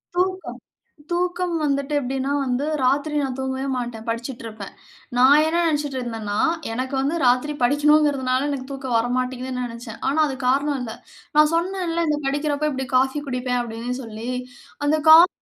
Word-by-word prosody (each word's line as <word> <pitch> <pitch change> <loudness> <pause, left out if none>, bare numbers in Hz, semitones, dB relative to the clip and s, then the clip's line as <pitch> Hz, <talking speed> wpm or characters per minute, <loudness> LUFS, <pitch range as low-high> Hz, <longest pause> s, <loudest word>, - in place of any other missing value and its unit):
தூக்கம், 370 +1 -1 0.5
தூக்கம் 355 0 0
வந்துட்டு 280 0 0
எப்பிடின்னா 270 +1 -2
வந்து 260 +3 -1 0.2
ராத்திரி 285 +4 +1
நான் 265 -2 -3
தூங்கவே 265 +1 -2
மாட்டேன். 235 -2 -5
படிச்சுட்டிருப்பேன். 230 -3 -5 0.5
நான் 280 +4 +7
என்ன 330 +2 +1
நெனச்சிட்ருந்தேன்னா 245 -9 -2 0.3
எனக்கு 255 +3 -3
வந்து 285 +5 0
ராத்திரி 255 +5 +2
படிக்கனுங்குறதுனால 285 -1 +3
எனக்கு 270 -1 -4
தூக்கம் 265 -3 -2
வரமாட்டேங்குதுன்னு 255 +1 -2
நெனச்சேன். 230 -1 -8
ஆனா 285 +4 0
அதுக்காரணம் 270 +2 0
இல்ல. 225 -2 -5 0.4
நான் 305 +1 +6
சொன்னேன்ல்ல! 340 -1 0
இந்த 300 -1 +1
படிக்கிறப்ப 290 +2 0
இப்பிடி 265 -2 -3
காஃபி 265 +3 +2
குடிப்பேன் 250 -1 -1
அப்பிடின்னு 235 +1 -4
சொல்லி. 225 +2 -6 0.6
அந்த 310 +1 +3
காஃபி 335 +3 +9
265 Hz, 135 wpm, -23 LUFS, 250-300 Hz, 0.6 s, காஃபி